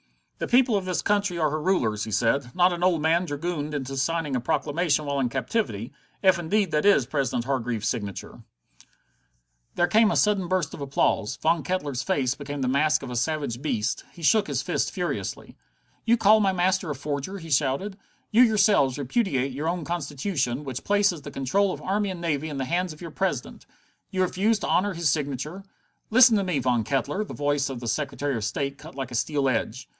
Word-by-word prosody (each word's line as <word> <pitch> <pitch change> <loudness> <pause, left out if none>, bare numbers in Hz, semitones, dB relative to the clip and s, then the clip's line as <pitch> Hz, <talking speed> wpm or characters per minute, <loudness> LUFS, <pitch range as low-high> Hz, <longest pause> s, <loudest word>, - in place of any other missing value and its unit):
"The - - -2
people 245 -2 +4
of 195 -2 -1
this 185 -1 -1
country 205 -3 +1
are 155 -3 +1
her 155 0 -2
rulers," 115 - 0
he - - -7
said, 120 +4 0
"not 180 0 +4
an 175 - -5
old 175 -4 +2
man 165 +3 +3
dragooned 150 -1 -3
into 135 -1 -4
signing 150 0 -1
a - - +1
proclamation 150 +4 0
while 140 -1 -1
in 125 -2 +1
captivity 130 - -2 0.3
if 185 -2 +5
indeed 190 +2 0
that 150 -1 +1
is 200 -11 +5
President 130 -3 -1
Hargreaves's 120 -5 -1
signature." 105 -4 -4 1.3
There 175 - +3
came 215 +5 +4
a - - 0
sudden 205 -4 +2
burst 180 -4 -1
of - - -8
applause. 135 -6 0
Von 165 0 +1
Kettler's 145 -8 -2
face 135 -2 0
became 145 -1 -5
the - - 0
mask 140 +3 +2
of 130 - -6
a - - -4
savage 135 -1 -2
beast. 115 -8 -1
He 170 - -13
shook 215 +7 +4
his - - -2
fist - - -1
furiously. - - -4 0.5
"You 235 +1 +4
call 215 0 +5
my 200 -2 +3
master 185 -1 +1
a 150 - -2
forger?" 145 +7 -4
he 165 -3 -9
shouted. 145 +8 0 0.4
"You 225 - +5
yourselves 205 - +4
repudiate 140 - 0
your 145 +5 -2
own 175 -2 -3
Constitution, 145 -4 -2
which 130 -3 -5
places 200 -5 +2
the 145 - -8
control 185 +10 +1
of - - -7
army 200 +2 0
and 185 -2 -5
navy 160 -2 -2
in 145 - -5
the 135 - -2
hands 175 +2 -1
of 155 - -16
your 170 -2 -7
President? 175 -8 -3 0.4
You 185 -1 0
refuse 200 +5 +1
to - - -3
honor 190 +1 +1
his 165 -4 +1
signature?" 150 +5 -3 0.5
"Listen 240 0 +7
to 200 - +1
me, 180 -5 -1
Mr. - - -4
Von 120 -3 +2
Kettler!" 140 - -1
The - - -8
voice 145 -1 0
of 130 -3 -5
the 120 - -6
Secretary 140 +1 -2
of 110 - -3
State 140 +6 -3
cut 160 +3 -12
like 135 -2 -5
a - - -4
steel 140 +2 0
edge. 125 0 -2
150 Hz, 205 wpm, -25 LUFS, 135-185 Hz, 1.3 s, Listen